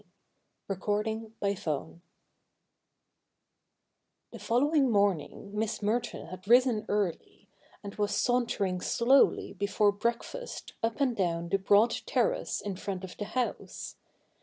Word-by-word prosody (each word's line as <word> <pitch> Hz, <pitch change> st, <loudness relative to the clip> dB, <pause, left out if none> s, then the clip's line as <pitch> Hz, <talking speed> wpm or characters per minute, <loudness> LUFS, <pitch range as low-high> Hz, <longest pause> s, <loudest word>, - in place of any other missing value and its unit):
v 195 Hz, -, -1 dB
CHAPTER 210 Hz, +2 st, 0 dB
n 220 Hz, 0 st, -5 dB
The 170 Hz, -6 st, -2 dB, 2.4 s
following 275 Hz, +3 st, +2 dB
morning 200 Hz, -3 st, 0 dB
Miss 215 Hz, 0 st, -2 dB
Merton 225 Hz, +4 st, -1 dB
had 185 Hz, +3 st, -10 dB
risen 240 Hz, -2 st, +4 dB
early, 205 Hz, -5 st, -2 dB, 0.3 s
and 200 Hz, 0 st, -7 dB
was 205 Hz, -1 st, -1 dB
sauntering 225 Hz, -7 st, +1 dB
slowly 260 Hz, +7 st, +3 dB
before 205 Hz, +1 st, +2 dB
breakfast 235 Hz, -, -4 dB
up 225 Hz, +3 st, -1 dB
and 255 Hz, -4 st, +2 dB
down 170 Hz, -3 st, -1 dB
the 195 Hz, -, +2 dB
broad 205 Hz, +4 st, +4 dB, 0.2 s
terrace -, -, 0 dB
in 200 Hz, -3 st, -4 dB
front 190 Hz, -1 st, -4 dB
of 185 Hz, -, -8 dB
the 205 Hz, -, -3 dB
house. 250 Hz, +3 st, -4 dB
210 Hz, 115 wpm, -30 LUFS, 195-235 Hz, 2.4 s, risen